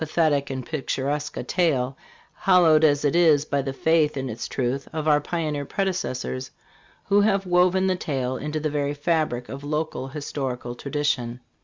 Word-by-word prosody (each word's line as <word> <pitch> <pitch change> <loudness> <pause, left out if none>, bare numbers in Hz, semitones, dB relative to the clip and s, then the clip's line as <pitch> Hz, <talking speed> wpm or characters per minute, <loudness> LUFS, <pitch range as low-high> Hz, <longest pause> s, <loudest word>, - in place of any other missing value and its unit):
thetic 155 -3 +1
and 130 -2 -4
picturesque 145 -1 -2
a - - -3
tale, 140 -8 +1 0.4
hallowed 175 -5 +4
as 145 -1 +3
it 145 - +2
is 155 -4 +5
by 140 -2 0
the 135 0 -3
faith 155 +1 +2
in 135 -1 -3
its 110 - -5
truth 130 +2 -2
of 155 -1 -3
our 150 -1 +4
pioneer 150 -3 -2
predecessors, 135 - -2 0.6
who 205 +1 +4
have 200 -2 +2
woven 180 +1 +3
the 190 -1 +2
tale 130 -7 -2
into 150 +4 -3
the 155 0 -1
very 145 0 -1
fabric 145 -5 0
of 140 +1 -8
local 150 -2 -2
historical 135 -3 -4
tradition. 125 -3 -2
150 Hz, 165 wpm, -24 LUFS, 135-165 Hz, 0.6 s, is